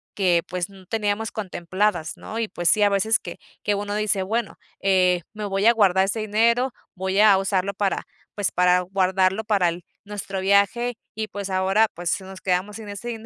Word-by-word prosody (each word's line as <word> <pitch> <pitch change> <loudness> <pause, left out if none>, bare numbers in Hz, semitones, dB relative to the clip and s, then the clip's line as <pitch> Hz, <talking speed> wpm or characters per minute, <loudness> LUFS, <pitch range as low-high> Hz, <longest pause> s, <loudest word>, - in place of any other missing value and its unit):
que 180 -4 +3
pues 180 0 -3
no 190 -1 -16
teníamos 215 +1 -1
contempladas 185 -3 -2
¿no? 225 - -7
Y 225 - -1
pues 175 -4 0
sí, 215 - +3
a 205 - +6
veces 210 +3 +2
que - - -8 0.2
que 205 - 0
uno 205 0 -3
dice 210 -2 0
bueno, 220 +3 -2 0.2
eh, 185 -2 +3
me 215 0 -6
voy 195 0 -1
a 235 - +7
guardar 190 -4 +3
este 200 +3 -2
dinero, 230 +4 +2 0.2
voy 190 +1 -1
a 210 -2 +7
usarlo 195 0 0
para, 200 0 -1 0.3
pues 205 -2 0
para 180 0 +4
guardarlo 190 +2 +1
para 205 -4 +2
el 170 +1 -6 0.2
nuestro 200 -1 -5
viaje, 200 +5 +2 0.2
y 220 0 -4
pues 200 -2 -6
ahora, 190 +4 +3
pues 175 +2 -2
nos 190 0 -10
quedamos 190 +3 -1
sin 220 -2 -9
ese 205 +4 -6
dinero 225 -2 -6
200 Hz, 195 wpm, -23 LUFS, 185-215 Hz, 0.3 s, a